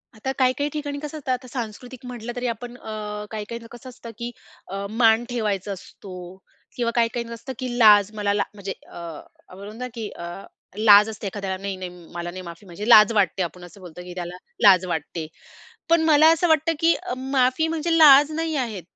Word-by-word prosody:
आता 265 +5 -3
काही-काही 260 +3 +2
ठिकाणी 290 -1 -4
कसं 300 +1 -7
असतं. 265 -3 -4
आता 255 0 -3
सांस्कृतिक 245 +1 -7
म्हटलं 240 -1 -7
तरी 245 0 -2
आपण 240 +1 -5
अ, 210 -2 -6
काही 215 -1 -5
काहींना 235 0 -7
कसं 250 +2 -11
असतं, 240 -2 -11
की 240 0 -5 0.4
अ, 195 +1 -5
मान 225 +1 +3
ठेवायचा 210 -4 -2
असतो. 185 -1 -10 0.4
किंवा 235 -2 -1
काही 235 -1 +3
काहींच 235 -1 -4
असतं, 245 +3 -7
की 250 -2 -4
लाज 210 -2 +7
मला 205 -1 0
ला 205 - +1
म्हणजे 200 -1 -6 0.2
अ, - - -15 0.5
आपण 185 - -14
म्हणतो 210 +2 -9
ना, 250 - -3
की 225 -3 -5
अ, 170 - -9 0.5
लाज 210 0 +7
असते 215 -1 -6
एखाद्याला. 195 -1 -4
नाही-नाही, 185 -2 -5
म 175 -2 -15
मला 175 0 -5
नाही 185 +1 -8
माफी 170 +3 -11
म्हणजे 195 +4 -7
लाज 215 -1 +8
वाटते. 195 -3 +1
आपण 175 +2 -7
असं 180 +2 -13
बोलतो 180 -1 -10
की 180 - -9
त्याला 180 0 -5 0.3
लाज 190 -3 +7
वाटते. 160 -1 -4 0.6
पण 335 0 +4
मला 310 0 +6
असं 345 +2 +1
वाटतं, 315 +1 +3
की 330 0 +4
अ, - - -5
माफी 260 +3 +1
म्हणजे 330 +1 0
लाज 295 -1 +8
नाही 320 0 -2
आहे. 230 -8 -2
225 Hz, 205 wpm, -23 LUFS, 195-255 Hz, 0.6 s, लाज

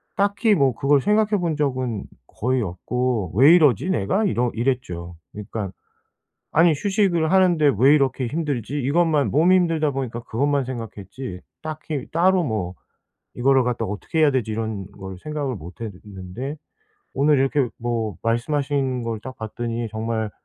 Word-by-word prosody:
딱히 205 +2 +2
뭐 135 -4 +3
그걸 140 +3 +2
생각해 210 +4 +2
본 165 -4 -1
적은 130 -7 -1 0.2
거의 125 +2 -1
없고 110 +1 -2
'왜 140 +8 +7
이러지 150 - +3
내가?' 185 - +1
이러 125 - +1
이랬죠. 100 -9 -2 0.2
그러니까 105 -1 -5 0.8
'아니 165 +2 +5
휴식을 190 -2 +1
하는데 175 -6 +4
왜 135 +5 +6
이렇게 135 -3 +1
힘들지?' 145 -3 -2
이것만, 150 +2 +2
몸이 175 +6 +4
힘들다 165 -4 +2
보니까 130 -4 -4
그것만 140 +4 0
생각했지 115 -4 -7 0.2
딱히 155 -2 -5
따로 185 +3 +3
뭐 100 -8 -2 0.6
'이거를 130 +1 +3
갖다가 115 -4 -2
어떻게 160 +9 -3
해야 150 -2 +5
되지?' 120 -5 -1
이런 110 -3 -3
걸 95 -1 -9
생각을 145 -5 -3
못 85 +1 -11
했는데 100 +6 -7 0.6
오늘 145 +1 +3
이렇게 135 0 +2
뭐 115 -3 -2
말씀하신 135 +2 0
걸 115 -2 -3
딱 130 +1 -8
봤더니 115 +1 -4
정말 110 -1 -2
130 Hz, 315 characters per minute, -23 LUFS, 110-150 Hz, 0.8 s, 왜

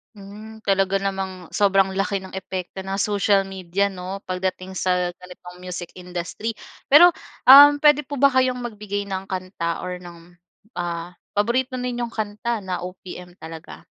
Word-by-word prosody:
Hmm. 215 +2 -12
Talaga 195 0 +1
namang 190 -2 -3
sobrang 195 -2 +3
laki 195 0 -1
ng 190 - -10
epekto 190 -1 -6
ng 190 0 -4
social 200 0 +2
media 195 +1 -2
'no, 190 +1 -7
pagdating 185 0 -3
sa 180 -1 0
ganitong 180 0 -13
music 180 -1 -7
industry. 180 +5 -5 0.3
Pero, 340 +6 +8 0.3
um, 285 +2 +10
pwede 295 -1 +6
po 290 - -5
ba 280 +1 +4
kayong 255 -1 +2
magbigay 210 -3 -4
ng 190 0 -4
kanta 185 -3 -4
or 180 0 -5
ng, 175 -1 -13 0.5
ah, 170 0 -4 0.2
paborito 245 +5 +1
ninyong 245 -2 -4
kanta 215 +1 -3
na 185 -1 -3
OPM 180 0 -9
talaga? 160 -3 -10
195 Hz, 145 wpm, -22 LUFS, 180-210 Hz, 0.5 s, um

